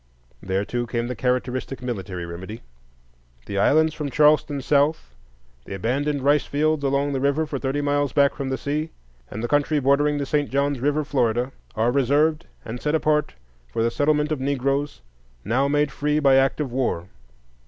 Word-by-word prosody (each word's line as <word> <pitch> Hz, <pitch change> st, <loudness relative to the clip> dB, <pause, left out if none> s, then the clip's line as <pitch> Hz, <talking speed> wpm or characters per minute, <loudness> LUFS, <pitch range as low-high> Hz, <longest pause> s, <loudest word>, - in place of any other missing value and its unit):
There 95 Hz, +1 st, -1 dB
too 120 Hz, +2 st, -3 dB
came 115 Hz, 0 st, -2 dB
the 125 Hz, +1 st, -4 dB
characteristic 125 Hz, +2 st, -2 dB
military 95 Hz, -7 st, -4 dB
remedy: 95 Hz, +6 st, -8 dB, 0.8 s
"The 100 Hz, -1 st, -3 dB
islands 155 Hz, +8 st, +3 dB
from 150 Hz, -2 st, -4 dB
Charleston 150 Hz, 0 st, +3 dB
south, 145 Hz, -, +1 dB, 0.5 s
the 95 Hz, -, -6 dB
abandoned 135 Hz, +7 st, -1 dB
rice 145 Hz, +1 st, +3 dB
fields 155 Hz, +1 st, 0 dB
along 140 Hz, +1 st, +1 dB
the 135 Hz, -, -1 dB
rivers 140 Hz, +3 st, 0 dB
for 140 Hz, -, -3 dB
thirty 135 Hz, +2 st, -1 dB
miles 145 Hz, -1 st, 0 dB
back 140 Hz, +1 st, +3 dB
from 135 Hz, -2 st, -4 dB
the 130 Hz, -, -1 dB
sea, 150 Hz, +3 st, -2 dB, 0.4 s
and 110 Hz, +3 st, -6 dB
the -, -, 0 dB
country 145 Hz, +2 st, +2 dB
bordering 145 Hz, +2 st, +2 dB
the 140 Hz, -, -2 dB
St. 145 Hz, +1 st, 0 dB
John's 140 Hz, 0 st, 0 dB
River, 145 Hz, +4 st, +1 dB
Florida, 125 Hz, -2 st, 0 dB, 0.2 s
are 115 Hz, +2 st, +2 dB
reserved 145 Hz, +4 st, +2 dB, 0.2 s
and 120 Hz, +2 st, -6 dB
set 150 Hz, +1 st, 0 dB
apart 150 Hz, -, +1 dB, 0.4 s
for 115 Hz, -, -1 dB
the 115 Hz, -, +1 dB
settlement 150 Hz, +3 st, +1 dB
of 155 Hz, -, -1 dB
Negroes 140 Hz, -, -1 dB, 0.4 s
now 125 Hz, +7 st, +1 dB
made 145 Hz, 0 st, +1 dB
free 150 Hz, +2 st, 0 dB
by 140 Hz, -3 st, +4 dB
act 135 Hz, +2 st, +3 dB
of 145 Hz, -5 st, -2 dB
war." 120 Hz, -9 st, -1 dB
140 Hz, 175 wpm, -23 LUFS, 125-145 Hz, 0.8 s, by